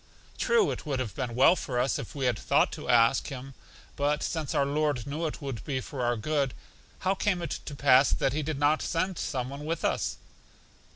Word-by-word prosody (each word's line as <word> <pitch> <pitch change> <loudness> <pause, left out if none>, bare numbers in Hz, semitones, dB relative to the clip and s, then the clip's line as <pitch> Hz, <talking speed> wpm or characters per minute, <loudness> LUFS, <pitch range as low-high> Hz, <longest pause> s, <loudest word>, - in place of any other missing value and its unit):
True, 460 -4 +3
it - - -5
would 140 -4 -2
have 115 -7 -3
been 120 +3 -4
well 135 +8 +6
for 130 -7 -3
us 130 +2 +1
if - - -8
we 135 -2 -1
had 120 -4 +1
thought - - +2
to - - -7
ask 120 +1 +4
Him; 135 0 -7 0.4
but 145 +1 0
since 160 -4 -2
our 140 - +3
Lord 145 -4 0
knew 155 +4 -2
it 150 - -7
would 130 -6 -5
be 135 -3 -2
for 130 +1 -6
our 120 0 +1
good, 140 +2 -1 0.5
how 190 +1 +2
came 195 -1 0
it 170 - -3
to 145 - -6
pass 135 -1 +5
that 135 - +1
He 155 - 0
did 155 0 -3
not 145 +2 +3
send 180 +2 -1
some 130 -4 -2
one 140 +2 -7
with 165 +2 -2
us? - - 0
140 Hz, 220 wpm, -28 LUFS, 130-155 Hz, 0.5 s, well